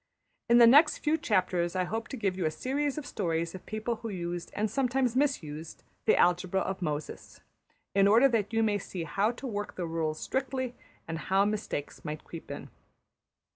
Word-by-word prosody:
In 235 - +7
the 240 - +9
next 290 +7 +7
few 305 +1 +1
chapters 185 - 0
I 185 - +2
hope 225 +5 -3
to 270 - -6
give 195 -5 0
you 180 -4 0
a - - +2
series 275 - -2
of 300 - -4
stories 170 -7 -2
of 185 - -10
people 215 +2 -2
who 225 +1 -6
used, 175 -3 -4
and 215 +1 +1
sometimes 250 +1 0
mis 275 - +2
used, 155 +2 -8 0.2
the - - +4
algebra 180 +2 +3
of 190 0 -3
Moses, 150 -3 -4 0.5
in 195 0 +5
order 230 +6 +6
that 220 -4 0
you 225 0 +2
may 210 -2 +1
see 180 -2 -5
how 195 +7 +1
to 260 - -9
work 205 -4 -4
the 180 - -3
rules 160 -2 -2
strictly 260 -2 -2 0.3
and 165 0 -4
how 195 +1 +4
mistakes 205 -8 -3
might 150 -1 -5
creep 165 - -10
in. - - -7
205 Hz, 195 wpm, -29 LUFS, 175-240 Hz, 0.5 s, the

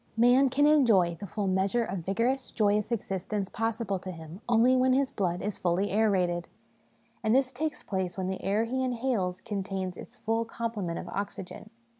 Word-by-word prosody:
Man 245 +4 +6
can 275 +3 +3
enjoy 225 - +4
the 200 - -6
full 205 +3 -3
measure 190 +5 +1
of 195 -3 -3
vigorous 230 +9 0
joyous 210 0 +1
existence 195 -2 -2
possible 225 -3 -2
to 185 - -8
him 165 +2 -9
only 240 +2 +5
when 255 0 +4
his 270 0 +2
blood 180 -7 -1
is 205 0 -3
fully 180 +3 +1
aerated; 185 -5 +1 0.8
and 220 +2 +3
this 265 -1 +3
takes 300 +5 -3
place 190 -2 -3
when 190 - -2
the 190 0 -3
air 205 +3 +1
he 260 +3 -1
inhales 235 -8 -1
contains 195 -4 -4
its - - -10
full 225 +1 -1
complement 225 -7 -3
of - - -6
oxygen. 200 +1 -6
210 Hz, 175 wpm, -29 LUFS, 190-240 Hz, 0.8 s, Man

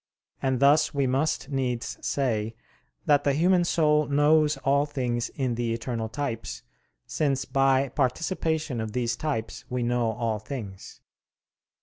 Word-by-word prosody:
And 130 -2 0
thus 145 +2 +4
we 140 -1 +2
must 135 +5 0
needs 125 -4 -2
say 115 -5 -1 0.5
that 145 -1 +4
the 140 - +2
human 175 +4 +3
soul 150 -3 +2
knows 150 +1 +3
all 140 +2 +2
things 125 -4 -2
in 130 -4 -1
the 115 -1 -1
eternal 115 -1 -4
types, 115 - -4 0.4
since 135 -3 0
by 135 0 +2
participation 155 0 -1
of 110 -1 -5
these 120 -1 0
types 130 -6 -3
we 125 -1 -1
know 120 -1 +1
all 115 -1 -2
things. 105 -5 -8
135 Hz, 135 wpm, -26 LUFS, 120-145 Hz, 0.5 s, thus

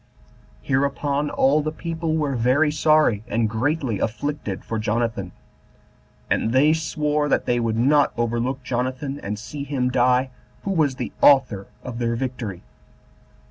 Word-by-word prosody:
Hereupon 140 +2 0
all 140 +3 +3
the 155 +1 -2
people 165 0 -3
were 145 -3 -1
very 130 +6 +3
sorry, 150 -8 +3
and 115 0 +1
greatly 120 - -1
afflicted 120 -4 -3
for 115 - -3
Jonathan; 110 -3 -1 1.0
and 115 - 0
they 145 +4 +5
sware 150 -2 -1
that - - +1
they 120 0 +1
would 115 -1 -1
not 140 +5 +4
overlook 120 +3 -1
Jonathan, 130 +3 -3
and 105 -3 -4
see 140 +6 -7
him 135 -3 -1
die, 125 +1 +2 0.3
who 195 - -2
was 155 -7 +1
the 125 -2 -5
author 130 -9 +4 0.2
of 125 -2 -6
their 115 -1 0
victory. 120 -7 -4
130 Hz, 140 wpm, -23 LUFS, 115-145 Hz, 1.0 s, they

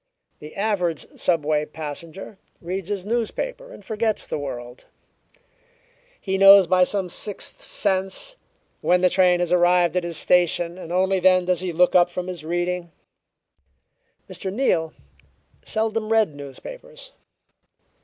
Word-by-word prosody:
The 150 +1 -11
average 195 -6 -1
subway 155 -3 +1
passenger 160 +6 -8 0.2
reads 185 +2 -5
his 200 -3 -3
newspaper 240 - -3
and - - -13
forgets 220 0 -1
the - - -4
world; 125 -3 -7 1.3
he 190 -1 -2
knows 195 0 +9
by 185 +1 +3
some 195 -1 -1
sixth 200 +3 -1
sense 195 - 0 0.5
when 180 0 +2
the 180 -1 +3
train 180 -2 +3
has 175 -1 -1
arrived 175 0 +3
at 180 - +1
his 170 -2 -5
station, 175 0 +1
and 170 - -9
only 190 +1 +1
then 185 0 +4
does 180 -2 0
he 180 0 -3
look 175 +2 +3
up 175 -1 +5
from 180 0 -5
his 180 -4 -7
reading. 175 +1 -3 1.4
Mr. 190 - -6
Neal 180 -9 0 0.7
seldom 220 0 -2
read 220 -8 +3
newspapers. - - -11
180 Hz, 135 wpm, -23 LUFS, 170-200 Hz, 1.4 s, knows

